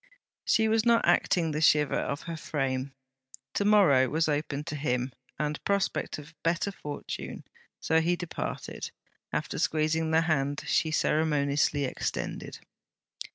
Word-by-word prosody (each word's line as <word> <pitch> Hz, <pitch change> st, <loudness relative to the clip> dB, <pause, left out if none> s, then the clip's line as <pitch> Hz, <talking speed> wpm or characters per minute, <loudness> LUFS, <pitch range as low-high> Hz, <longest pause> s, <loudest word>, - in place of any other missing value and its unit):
She 220 Hz, 0 st, +3 dB
was 220 Hz, 0 st, +3 dB
not 235 Hz, -1 st, +4 dB
acting 175 Hz, -1 st, +3 dB
the 150 Hz, +1 st, -2 dB
shiver 150 Hz, -2 st, +4 dB
of 140 Hz, -, -2 dB
her 165 Hz, -1 st, -5 dB
frame. 135 Hz, -3 st, -2 dB, 0.6 s
To -, -, +1 dB
morrow 175 Hz, -12 st, +5 dB
was 160 Hz, +3 st, +1 dB
open 145 Hz, -1 st, -1 dB
to 155 Hz, -1 st, -5 dB
him, 125 Hz, -3 st, -1 dB, 0.2 s
and 150 Hz, +1 st, -2 dB
prospect 200 Hz, -1 st, 0 dB
of 150 Hz, +2 st, -11 dB
better 170 Hz, +4 st, 0 dB
fortune, 150 Hz, -6 st, -6 dB, 0.4 s
so 160 Hz, 0 st, +2 dB
he 175 Hz, +2 st, +2 dB
departed, 175 Hz, -2 st, -5 dB, 0.4 s
after -, -, -2 dB
squeezing 160 Hz, +1 st, +1 dB
the 160 Hz, 0 st, +4 dB
hand 145 Hz, -3 st, 0 dB
she 160 Hz, -, +2 dB
ceremoniously 145 Hz, -2 st, +1 dB
extended. 130 Hz, -, -4 dB
155 Hz, 135 wpm, -28 LUFS, 145-170 Hz, 0.6 s, morrow